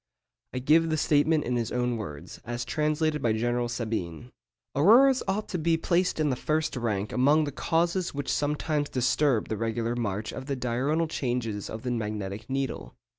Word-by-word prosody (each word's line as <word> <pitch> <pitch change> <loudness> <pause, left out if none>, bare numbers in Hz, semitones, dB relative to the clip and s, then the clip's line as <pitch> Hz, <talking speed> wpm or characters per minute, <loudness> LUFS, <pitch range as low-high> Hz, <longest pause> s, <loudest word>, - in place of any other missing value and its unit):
I - - -5
give 155 +6 +3
the 155 - +1
statement 150 +1 +3
in 125 0 -1
his 115 -2 -2
own 125 -1 0
words, 75 -10 -7
as 120 +1 -4
translated 155 0 0
by 115 -3 +2
General 120 +2 0
Sabine:—'Auroras 120 - +1
ought 205 +2 -1
to 180 - -2
be 165 +1 +2
placed 175 +1 +1
in 150 -2 +2
the - - 0
first 155 +3 -1
rank 105 -4 -2
among 145 +5 +4
the 145 - -3
causes 170 +5 0
which 145 -1 -2
sometimes 150 0 -1
disturb 130 -1 +1
the 110 - -3
regular 115 +1 -1
march 110 -2 -2
of 130 +1 -7
the 140 - -1
diurnal 130 +6 0
changes 120 -8 -2
of 110 - -7
the 125 - -2
magnetic 105 -1 -4
needle. 135 0 -3
130 Hz, 175 wpm, -27 LUFS, 115-155 Hz, -, among